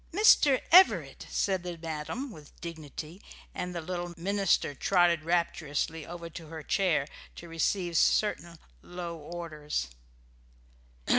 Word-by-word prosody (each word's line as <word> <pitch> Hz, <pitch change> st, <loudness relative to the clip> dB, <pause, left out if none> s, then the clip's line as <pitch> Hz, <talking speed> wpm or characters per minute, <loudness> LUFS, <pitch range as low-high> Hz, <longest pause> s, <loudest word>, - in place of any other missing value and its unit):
"Mister 315 Hz, -8 st, +5 dB
Everett!" 370 Hz, +3 st, +5 dB
said 190 Hz, -2 st, 0 dB
the 175 Hz, -1 st, -6 dB
madam, 165 Hz, -, -5 dB
with 150 Hz, -7 st, -14 dB
dignity, 160 Hz, +1 st, -8 dB, 0.3 s
and 180 Hz, 0 st, -4 dB
the 170 Hz, -, -2 dB
little 175 Hz, +1 st, -5 dB
minister 195 Hz, -3 st, +1 dB
trotted 175 Hz, +2 st, +2 dB
rapturously 165 Hz, -2 st, -1 dB
over 170 Hz, 0 st, -7 dB
to 165 Hz, -1 st, -10 dB
her 160 Hz, 0 st, -8 dB
chair 165 Hz, -6 st, +1 dB, 0.3 s
to 170 Hz, -, -10 dB
receive 170 Hz, +2 st, -1 dB
certain 170 Hz, -2 st, +2 dB, 0.2 s
low 175 Hz, -1 st, -6 dB
orders. 155 Hz, -, -5 dB
170 Hz, 120 wpm, -29 LUFS, 160-180 Hz, 0.3 s, Mister